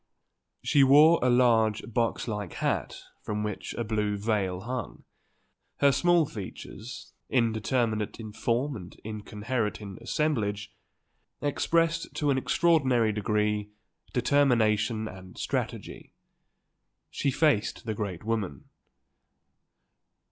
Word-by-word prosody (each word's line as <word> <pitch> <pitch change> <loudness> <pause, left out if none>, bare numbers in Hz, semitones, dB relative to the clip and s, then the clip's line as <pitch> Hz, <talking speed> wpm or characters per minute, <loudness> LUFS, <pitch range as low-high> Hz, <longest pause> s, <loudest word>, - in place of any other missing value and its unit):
She 140 - +4
wore 150 +5 +7
a 125 - +3
large, 115 -3 +3
box 115 +1 0
like 105 -5 -4
hat - - -2 0.2
from 105 0 -3
which 105 -2 -4
a 120 - -2
blue 105 -2 -1
veil 100 -3 -1
hung. 125 0 -5 0.7
Her 140 -1 +5
small 170 +3 +3
features, 110 +1 -9 0.2
indeterminate 115 -2 0
in 110 -2 -8
form 125 +6 0
and 90 -5 -10
incoherent 105 +1 -3
in 100 -3 -9
assemblage, 105 -10 -1 0.7
expressed 165 +3 0
to 145 -2 +1
an 130 - +2
extraordinary 130 -9 +3
degree 105 0 0 0.4
determination 115 -4 +2
and 95 -3 -11
strategy. - - -4 1.0
She 140 - 0
faced 140 -8 +1
the 110 - -2
great 100 -5 -4
woman. 105 -10 -3
110 Hz, 105 wpm, -28 LUFS, 105-130 Hz, 1.0 s, wore